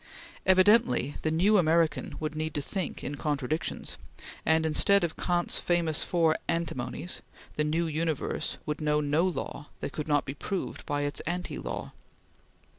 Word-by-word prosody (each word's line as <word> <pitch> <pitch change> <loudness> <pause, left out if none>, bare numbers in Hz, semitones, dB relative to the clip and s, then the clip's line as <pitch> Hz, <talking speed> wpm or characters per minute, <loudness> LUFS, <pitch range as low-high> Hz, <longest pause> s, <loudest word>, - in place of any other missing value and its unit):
Evidently 185 - +5
the 155 - 0
new 190 +6 +4
American 165 -1 +2
would 155 0 -3
need 155 0 -3
to 145 - 0
think 185 +2 -4
in 140 - -3
contradictions, 145 +2 -2 0.5
and 160 +1 +4
instead 200 +5 +4
of 165 -2 -1
Kant's 175 -1 +1
famous 170 -3 +1
four 165 -3 +2
antinomies, 165 0 -2 0.3
the 150 - +1
new 160 +3 +1
universe 160 -1 -1
would 150 +1 -3
know 150 0 +2
no 150 +3 +2
law 160 -4 -4
that - - -4
could 150 - -4
not 145 -2 +2
be 135 - -4
proved 185 +6 -4
by 145 -1 0
its 145 0 -2
anti 180 +1 -3
law. - - -5
160 Hz, 155 wpm, -29 LUFS, 150-175 Hz, 0.5 s, Evidently